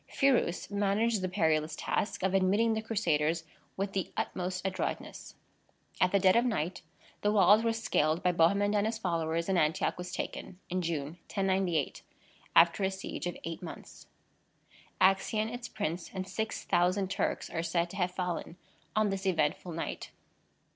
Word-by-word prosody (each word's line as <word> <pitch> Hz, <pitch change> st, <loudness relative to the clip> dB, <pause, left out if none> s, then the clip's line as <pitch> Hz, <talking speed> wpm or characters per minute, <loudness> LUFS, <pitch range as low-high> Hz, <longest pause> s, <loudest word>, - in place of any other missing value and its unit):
Phirous 255 Hz, -, +1 dB
managed 205 Hz, +2 st, +1 dB
the 185 Hz, -, -1 dB
perilous 160 Hz, -4 st, +1 dB
task 205 Hz, -, -2 dB
of 190 Hz, 0 st, +1 dB
admitting 200 Hz, +4 st, +3 dB
the 220 Hz, -, -1 dB
Crusaders 165 Hz, -7 st, 0 dB, 0.3 s
with 195 Hz, 0 st, -2 dB
the 190 Hz, -2 st, -2 dB
utmost 185 Hz, 0 st, -3 dB
adroitness. 190 Hz, -1 st, -4 dB, 0.7 s
At 180 Hz, -, +4 dB
the 200 Hz, -, +4 dB
dead 185 Hz, -1 st, +5 dB
of 235 Hz, -, +5 dB
night 185 Hz, -8 st, -1 dB, 0.4 s
the 205 Hz, -, +2 dB
walls 210 Hz, +1 st, +6 dB
were 230 Hz, -, +2 dB
scaled 170 Hz, -7 st, +1 dB
by 180 Hz, -, +4 dB
Bohemond 200 Hz, +5 st, +3 dB
and 205 Hz, +1 st, +2 dB
his 220 Hz, 0 st, -2 dB
followers, 170 Hz, -4 st, -1 dB
and 190 Hz, -2 st, +2 dB
Antioch 155 Hz, 0 st, +1 dB
was 180 Hz, 0 st, -5 dB
taken, 180 Hz, 0 st, -5 dB
in 185 Hz, 0 st, 0 dB
June, 165 Hz, -1 st, -3 dB
1098, 190 Hz, -6 st, 0 dB, 0.5 s
after 170 Hz, +4 st, +6 dB
a 190 Hz, -, +3 dB
siege 190 Hz, -2 st, -5 dB
of 175 Hz, -, -4 dB
eight 165 Hz, +3 st, -5 dB
months. 175 Hz, -, -10 dB, 0.9 s
Accien, 215 Hz, +4 st, +2 dB
its 245 Hz, 0 st, -5 dB
prince, 175 Hz, -5 st, -3 dB
and 190 Hz, 0 st, -5 dB
6,000 190 Hz, -2 st, 0 dB
Turks, 190 Hz, -, -2 dB
are 165 Hz, -, -1 dB
said 170 Hz, +1 st, 0 dB
to 195 Hz, -, -8 dB
have 180 Hz, -2 st, +1 dB
fallen 180 Hz, -1 st, -4 dB, 0.4 s
on 215 Hz, -2 st, +2 dB
this 195 Hz, 0 st, -2 dB
eventful 165 Hz, 0 st, 0 dB
night. 165 Hz, 0 st, -4 dB
185 Hz, 160 wpm, -31 LUFS, 170-205 Hz, 0.9 s, walls